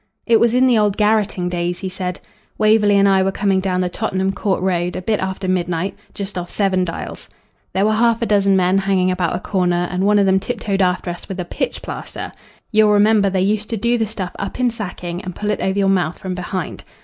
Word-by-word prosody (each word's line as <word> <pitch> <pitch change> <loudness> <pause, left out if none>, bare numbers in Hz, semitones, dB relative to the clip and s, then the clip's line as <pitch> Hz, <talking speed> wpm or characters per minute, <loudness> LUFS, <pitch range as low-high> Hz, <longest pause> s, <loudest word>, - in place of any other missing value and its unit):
"It 230 -1 +4
was 235 0 +3
in 255 +1 +4
the 245 -4 +4
old 205 -2 +1
garrotting 210 -4 +1
days," 175 0 -2
he 190 - -3
said. 185 -1 -4 0.4
"Waverley 215 -1 +4
and 200 0 +5
I 195 -1 +4
were 190 +1 +1
coming 195 -1 +1
down 185 -1 0
the 180 - 0
Tottenham 190 0 -1
Court 195 -1 -1
Road 180 -1 0
a 185 - -3
bit 215 +1 0
after 190 0 -3
midnight 180 0 -1 0.2
just 195 -2 -4
off 175 -1 -6
Seven 190 -3 +1
Dials. 165 -2 -6 0.4
There 195 +2 +2
were 215 - +2
half 230 +1 +3
a - - +2
dozen 200 -2 +3
men 185 +1 +3
hanging 190 -1 +1
about 180 -2 -1
a - - -2
corner, 180 -2 0
and 180 +1 -1
one 210 +1 +4
of 200 - +4
them 190 0 +3
tiptoed 205 -2 -2
after 180 -1 0
us 175 - -10
with 190 -1 -5
a 180 - -2
pitch - - -3
plaster - - -6 0.4
you'll 215 -1 +4
remember 205 -1 +4
they 190 -1 0
used 210 +2 0
to 225 - -2
do 235 +3 +1
the 220 - 0
stuff 195 -4 -4
up - - -5
in 250 -1 +2
sacking 180 -5 -5
and 185 -2 -6
pull 210 0 -2
it - - -2
over 190 +1 0
your 200 -1 +2
mouth 180 -4 +1
from 185 -1 -5
behind. 180 -1 -5
195 Hz, 235 wpm, -19 LUFS, 180-210 Hz, 0.4 s, and